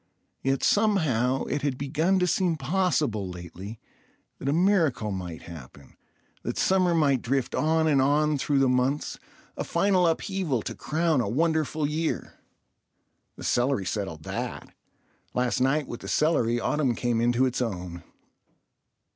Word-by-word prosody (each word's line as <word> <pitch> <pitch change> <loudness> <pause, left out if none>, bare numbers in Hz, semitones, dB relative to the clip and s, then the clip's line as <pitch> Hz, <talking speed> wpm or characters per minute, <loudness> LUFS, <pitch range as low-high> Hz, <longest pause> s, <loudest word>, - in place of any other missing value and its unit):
Yet 135 0 0
somehow 145 - +2
it 145 - -2
had 140 -3 -1
begun 155 +7 +1
to 180 - +2
seem 180 -1 +1
possible 150 - 0
lately 90 +5 -8 0.6
that 135 - -2
a - - +3
miracle 165 - +2
might 90 -4 -6
happen, 70 -4 -12 0.5
that - - -4
summer 185 -2 +3
might 140 -6 +3
drift 135 +1 -1
on 160 +1 +2
and 140 -3 +4
on 150 +2 +2
through 145 +1 +1
the 135 -1 +4
months—a 125 +3 -2
final 190 -3 +2
upheaval 165 - -1
to - - -4
crown 160 -3 0
a 100 - -2
wonderful 155 +2 +1
year. 155 +2 -2 1.0
The - - -10
celery 120 -5 +1
settled 90 -6 -4
that. - - -5 0.6
Last 125 0 0
night 140 +3 +2
with 120 - -7
the - - -9
celery 120 -7 +2
autumn 135 -1 0
came 120 -1 0
into 120 +2 +3
its 125 0 -1
own. 90 -7 -4
135 Hz, 140 wpm, -26 LUFS, 115-160 Hz, 1.0 s, and